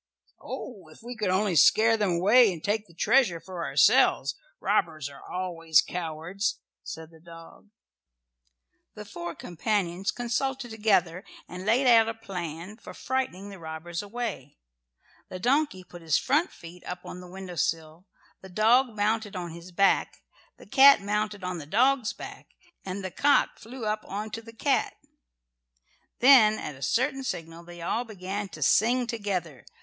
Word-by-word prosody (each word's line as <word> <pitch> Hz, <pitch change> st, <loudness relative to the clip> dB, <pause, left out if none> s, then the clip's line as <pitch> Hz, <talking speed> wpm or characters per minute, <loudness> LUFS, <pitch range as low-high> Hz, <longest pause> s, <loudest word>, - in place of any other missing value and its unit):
"Oh, 200 Hz, -10 st, -8 dB
if 155 Hz, +7 st, -17 dB
we 245 Hz, +1 st, -7 dB
could 215 Hz, -4 st, -2 dB
only 190 Hz, 0 st, +1 dB
scare 225 Hz, +8 st, +5 dB
them 205 Hz, -5 st, 0 dB
away 210 Hz, +6 st, +5 dB
and 165 Hz, -3 st, -8 dB
take 210 Hz, +1 st, -1 dB
the 170 Hz, -, -19 dB
treasure 190 Hz, -3 st, +3 dB
for 180 Hz, 0 st, -7 dB
ourselves! -, -, +3 dB, 0.3 s
Robbers 155 Hz, -4 st, 0 dB
are 140 Hz, -, -13 dB
always 165 Hz, -3 st, +1 dB
cowards," 175 Hz, +5 st, -3 dB, 0.2 s
said 160 Hz, 0 st, -9 dB
the 160 Hz, -, -17 dB
dog. 165 Hz, +4 st, -14 dB, 1.3 s
The 210 Hz, -, -9 dB
four 175 Hz, -4 st, -7 dB
companions 185 Hz, 0 st, -2 dB
consulted 245 Hz, +1 st, -2 dB
together 195 Hz, -5 st, +1 dB, 0.2 s
and 180 Hz, +3 st, -8 dB
laid 245 Hz, +5 st, +3 dB
out 225 Hz, -2 st, +6 dB
a 225 Hz, -, -4 dB
plan 180 Hz, -2 st, -7 dB
for -, -, -12 dB
frightening 255 Hz, -7 st, -3 dB
the 195 Hz, -, -11 dB
robbers 160 Hz, +1 st, -6 dB
away. 205 Hz, -, -6 dB, 0.7 s
The 185 Hz, -, -6 dB
donkey 250 Hz, -2 st, 0 dB
put 175 Hz, -1 st, -13 dB
his 160 Hz, -3 st, +2 dB
front 300 Hz, +7 st, +1 dB
feet 170 Hz, +1 st, -13 dB
up 180 Hz, 0 st, -6 dB
on 180 Hz, -, -8 dB
the 180 Hz, -, -12 dB
windowsill, 170 Hz, -2 st, -4 dB, 0.3 s
the 190 Hz, -, -12 dB
dog 225 Hz, +5 st, +3 dB
mounted 215 Hz, 0 st, -1 dB
on 175 Hz, -2 st, -5 dB
his 170 Hz, +2 st, -11 dB
back, 195 Hz, +2 st, +1 dB, 0.3 s
the -, -, -15 dB
cat 275 Hz, 0 st, +7 dB
mounted 210 Hz, 0 st, -2 dB
on 180 Hz, -1 st, -3 dB
the 145 Hz, -, -9 dB
dog's 245 Hz, -, +2 dB
back, -, -, -11 dB, 0.3 s
and 190 Hz, +1 st, -5 dB
the 185 Hz, -, -4 dB
cock 285 Hz, +8 st, +2 dB
flew 235 Hz, 0 st, -8 dB
up 215 Hz, 0 st, -2 dB
on 210 Hz, +2 st, -5 dB
to 225 Hz, -, -5 dB
the 230 Hz, 0 st, -13 dB
cat. 270 Hz, +5 st, 0 dB, 1.3 s
Then 240 Hz, -5 st, +7 dB
at 150 Hz, -, -6 dB
a 135 Hz, -, -15 dB
certain 265 Hz, -, 0 dB
signal 165 Hz, -8 st, -5 dB
they 175 Hz, 0 st, -11 dB
all 225 Hz, +7 st, -1 dB
began 200 Hz, -2 st, -5 dB
to 155 Hz, -3 st, -5 dB
sing 240 Hz, -, +3 dB
together. 185 Hz, -, -4 dB
195 Hz, 160 wpm, -27 LUFS, 170-225 Hz, 1.3 s, cat